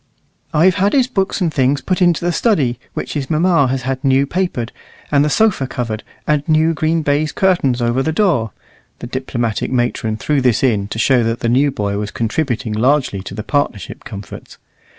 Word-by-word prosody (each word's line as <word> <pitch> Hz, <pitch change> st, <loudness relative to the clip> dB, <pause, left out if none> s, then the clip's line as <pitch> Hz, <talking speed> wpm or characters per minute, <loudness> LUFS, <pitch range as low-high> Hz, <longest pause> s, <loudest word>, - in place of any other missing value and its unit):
"I've 170 Hz, +4 st, +3 dB
had 200 Hz, +1 st, +2 dB
his 265 Hz, -3 st, +4 dB
books 200 Hz, -6 st, -1 dB
and 165 Hz, -4 st, 0 dB
things 135 Hz, +1 st, +2 dB
put 185 Hz, 0 st, -2 dB
into 175 Hz, -1 st, +3 dB
the 175 Hz, -, +2 dB
study, 150 Hz, -, +1 dB, 0.2 s
which -, -, -4 dB
his 140 Hz, -3 st, -3 dB
mamma 165 Hz, -3 st, +3 dB
has 130 Hz, 0 st, -2 dB
had 130 Hz, 0 st, -3 dB
new 135 Hz, 0 st, +3 dB
papered, 145 Hz, -8 st, -2 dB, 0.4 s
and 145 Hz, -1 st, +4 dB
the 150 Hz, -, +1 dB
sofa 185 Hz, -5 st, +2 dB
covered, 115 Hz, -4 st, -4 dB, 0.2 s
and 150 Hz, -1 st, +2 dB
new 160 Hz, +1 st, +3 dB
green 160 Hz, +1 st, 0 dB
baize 145 Hz, +1 st, +1 dB
curtains 140 Hz, -11 st, +1 dB
over 120 Hz, +3 st, +1 dB
the 160 Hz, -, 0 dB
door" 160 Hz, -, +1 dB, 0.5 s
(the -, -, -8 dB
diplomatic 120 Hz, -3 st, -3 dB
matron 120 Hz, -3 st, -1 dB
threw 145 Hz, +4 st, 0 dB
this 125 Hz, -1 st, +2 dB
in, 105 Hz, -6 st, +1 dB
to 110 Hz, -, -6 dB
show 125 Hz, +1 st, +3 dB
that 115 Hz, +1 st, -2 dB
the 115 Hz, -, 0 dB
new 135 Hz, +4 st, +3 dB
boy 100 Hz, -6 st, -2 dB
was 105 Hz, 0 st, -3 dB
contributing 115 Hz, -1 st, -2 dB
largely 125 Hz, -2 st, +1 dB
to 95 Hz, -, -8 dB
the 105 Hz, -, -5 dB
partnership 145 Hz, -, -2 dB
comforts). 100 Hz, 0 st, -9 dB
135 Hz, 190 wpm, -17 LUFS, 120-160 Hz, 0.5 s, his